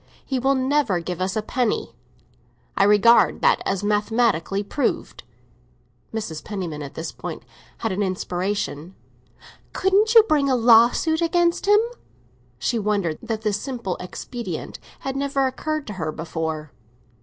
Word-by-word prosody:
He 265 -2 -1
will 270 +2 +2
never 260 -7 +1
give 175 +1 -5
us 185 0 -1
a 215 - -1
penny; 245 0 -1 0.8
I 195 - +4
regard 210 +3 +5
that - - +3
as 195 - -1
mathematically 210 -2 +1
proved." 280 +8 -2 0.9
Mrs. 165 -9 -5
Penniman 180 -8 -5
at 140 -2 -8
this 160 - -5
point - - -7 0.3
had 225 - -2
an 190 +2 -2
inspiration. 185 -3 -3 0.8
"Couldn't 410 +4 +2
you 450 - +10
bring 295 -8 +2
a 260 - +3
lawsuit 240 +7 +4
against 340 +2 +1
him?" 415 0 +7 0.8
She 235 - -1
wondered 200 -7 -1
that 225 -2 -4
this 210 -1 0
simple 235 -9 -4
expedient 235 +6 -6 0.2
had 270 0 -4
never 275 0 0
occurred 310 +3 -3
to 210 - -6
her 160 -5 -3
before. 160 -1 -4
215 Hz, 140 wpm, -23 LUFS, 185-270 Hz, 0.9 s, you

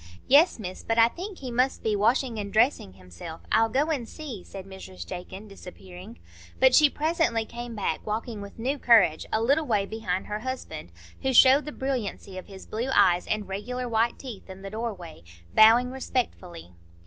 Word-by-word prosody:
"Yes, 295 +7 +5
Miss; 185 -4 -7
but 225 - -2
I 230 0 +6
think 370 - -8
he 260 -2 -7
must 255 +3 0
be 215 -1 +1
washing 230 +3 +1
and 200 -1 -5
dressing 220 - +2
himself; 95 - -11
I'll 225 0 +3
go 285 +7 +1
and 250 -7 -3
see," 260 - -8
said 195 -1 -10
Mrs 190 -1 -10
Jakin, 190 +3 -8
disappearing. 190 +2 -12 0.4
But - - +5
she 300 -2 +7
presently 300 -8 0
came 235 0 -8
back 205 - -2
walking 220 0 -4
with 200 0 -10
new 265 +5 -2
courage 195 -11 +4
a 220 - +1
little 285 +5 +2
way 200 -1 +1
behind 200 -4 -3
her 210 0 -4
husband, 215 - -6 0.3
who 265 - 0
showed 270 +4 +7
the 300 - -5
brilliancy 240 -9 -4
of - - -13
his 195 -1 -11
blue 235 +4 -4
eyes 175 0 +4
and 215 -2 -2
regular 245 +6 -4
white 230 0 +1
teeth 235 -8 -10
in 190 +1 -10
the 195 - -7
doorway, 210 - -6 0.3
bowing 235 +3 +6
respectfully. 195 - -4
225 Hz, 185 wpm, -26 LUFS, 195-255 Hz, 0.4 s, she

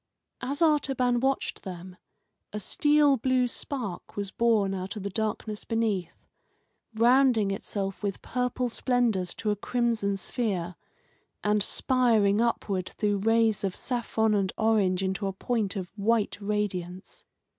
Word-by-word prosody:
As 285 +5 -1
Artaban 270 -6 +2
watched 270 +2 -1
them, 180 -1 -8 0.6
a 210 - -4
steel 295 +5 +3
blue 255 +1 +2
spark 235 -6 -5
was 200 -1 -3
born 220 -4 +2
out 190 +2 -4
of 210 - -6
the 200 - -3
darkness 215 0 -3
beneath, 215 -6 -2 0.7
rounding 235 -3 +4
itself 195 0 -4
with 200 -2 -2
purple 250 0 -1
splendours 230 -7 0
to 215 - -1
a - - 0
crimson 220 -2 0
sphere, 190 -5 -2 0.7
and 210 0 +2
spiring 225 -4 +2
upward 200 -5 -1
through 205 -2 +1
rays 225 0 +2
of 190 -2 -1
saffron 225 -3 0
and 195 -2 +1
orange 200 -4 +2
into 190 +1 -1
a 195 - -3
point 220 0 -1
of 185 -3 -5
white 220 +1 +1
radiance. 200 - -3
215 Hz, 135 wpm, -27 LUFS, 195-245 Hz, 0.7 s, rounding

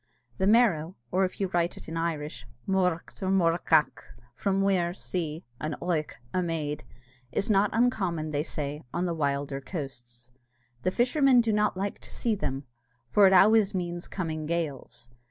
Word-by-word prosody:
The 190 - +2
Merrow, 195 -7 +3 0.2
or 190 +1 +3
if 185 - -6
you 195 -2 0
write 175 -1 0
it - - -11
in 160 - -6
the 165 - -2
Irish, 155 -3 -3 0.2
Moruadh 180 -3 0
or 190 - -1
Murrúghach, 165 -4 +3 0.3
from 195 +10 0
muir, 180 -3 +1
sea, 165 -4 -3 0.2
and 155 0 -3
oigh, 165 -4 -1 0.2
a 185 - +1
maid, 155 -3 -2 0.5
is 215 - 0
not 200 0 +4
uncommon, 190 -10 0
they 145 -1 0
say, 150 -1 -4
on 175 +1 -1
the 175 - -1
wilder 140 -2 -1
coasts. 125 -6 -7 0.5
The 185 - +1
fishermen 255 +4 +4
do 230 -2 +2
not 210 -2 +1
like 200 +1 -3
to - - -13
see 230 - -1
them, 135 -9 -3 0.5
for 205 -2 +7
it 190 - +4
always 205 +1 +5
means 175 -1 -3
coming 155 -4 -4
gales. 150 -7 -4
175 Hz, 170 wpm, -28 LUFS, 155-195 Hz, 0.5 s, for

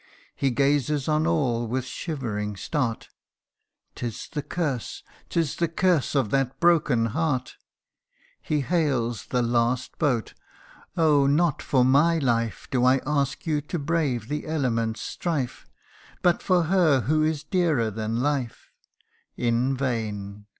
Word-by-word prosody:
He 135 - +1
gazes 140 +2 +1
on 155 +1 +2
all 125 -8 +1
with 130 +2 -2
shivering 115 - -4
start 125 -2 -2 0.4
" - - -55
'Tis 120 -3 -5
the 150 - -3
curse 140 -6 -3 0.3
'tis 165 -5 -1
the 170 - +1
curse 165 -3 +1
of 130 -7 +1
that 135 -1 0
broken 150 -9 +3
heart 145 -5 -1 0.4
!" - - -63 0.3
He 150 -3 -1
hails 135 -7 0
the 125 -1 0
last 120 +2 0
boat 130 -8 0 0.3
" - - -25
Oh! 150 -4 +4
not 150 +2 +2
for 130 -3 +2
my 150 +6 +4
life 115 -6 -1
Do 125 -2 +1
I 130 +1 +5
ask 140 +1 -1
you 155 -3 0
to 150 +4 -4
brave 145 -7 -1
the 150 +3 -4
element's 115 -8 -1
strife; 140 -8 -3 0.6
But 175 -1 +3
for 180 -2 +2
her 165 -6 +3
who 155 +6 +1
is 155 -1 0
dearer 155 - +1
than 110 +3 -2
life 140 -5 -2 0.3
" - - -47 0.3
in 125 +3 +1
vain 105 -5 -3
135 Hz, 145 wpm, -25 LUFS, 120-155 Hz, 0.6 s, I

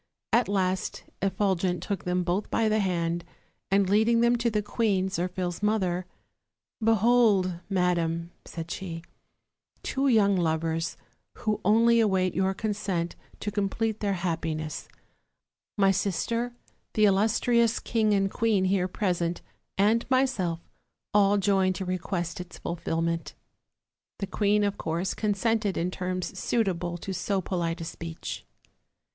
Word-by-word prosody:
At 235 +1 +4
last 190 -2 -1 0.2
Effulgent 185 -2 0
took 200 -2 -3
them 180 0 +1
both 180 +4 -1
by 225 - +2
the 215 0 +2
hand, 170 -3 0 0.5
and 195 0 +3
leading 220 +4 +4
them 235 +1 +4
to 235 0 +1
the 210 -2 0
queen, 200 -3 +1
Zirphil's 180 -1 -2
mother: 185 -4 0 0.8
"Behold, 220 -5 +4
madam," 170 -3 0
said 165 0 -7
she, 165 -3 -5 0.8
"two 270 +1 0
young 210 -5 +4
lovers, 165 -1 0 0.4
who 215 -2 -2
only 230 +3 +5
await 190 -4 +2
your 190 +2 +1
consent 200 -5 -2 0.3
to 210 - -2
complete 210 +2 -1
their 200 -2 0
happiness; 165 -3 -3 0.9
my 195 -1 +5
sister, 220 +6 -1 0.4
the 215 - +4
illustrious 225 +3 +3
king 220 -2 +1
and 195 -1 +2
queen 215 -4 +2
here 185 -1 +2
present, 175 -3 -1 0.3
and 220 +5 +3
myself, 245 -11 +1 0.5
all 205 0 +5
join 195 -1 +2
to 190 +1 -4
request 180 -1 -3
its 180 0 -10
fulfillment/' 165 0 -2 0.8
The 200 - -2
queen, 205 +1 +2
of 205 0 -1
course, 170 +4 -1
consented 210 -1 0
in 175 +2 0
terms 185 0 -3
suitable 175 -6 0
to 190 +2 -5
so 190 +2 -1
polite 170 -2 -2
a - - -4
speech. 165 0 -6
190 Hz, 130 wpm, -27 LUFS, 175-210 Hz, 0.9 s, only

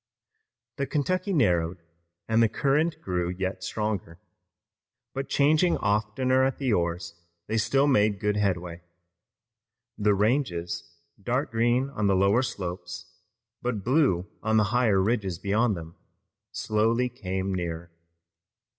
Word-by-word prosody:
The 140 - -1
Kentucky 185 +6 -1
narrowed 90 - +2 0.5
and 110 +1 +3
the 115 - +4
current 150 +7 +1
grew 90 -2 -1
yet 95 +1 -3
stronger. 105 -6 -3 0.9
But 135 0 -4
changing 155 +5 +3
oftener 110 +5 +1
at 135 0 0
the 130 -5 0
oars 85 -1 -1 0.3
they 110 - 0
still 135 +6 +2
made 105 -7 +3
good 105 -1 0
headway. 90 -4 -1 1.2
The 105 -1 +3
ranges, 95 -7 -1 0.3
dark 125 +7 -1
green 120 +4 +1
on 105 -7 -1
the 100 - +3
lower 100 +6 +3
slopes, 90 -6 -6 0.5
but 120 -5 -2
blue 125 - +2
on 110 0 +1
the 105 - +5
higher 115 -6 +3
ridges 95 -3 0
beyond 105 +3 +1
them, 80 0 -9 0.6
slowly 115 +3 +1
came 95 -5 -3
nearer. 85 -2 -4
105 Hz, 125 wpm, -27 LUFS, 90-125 Hz, 1.2 s, the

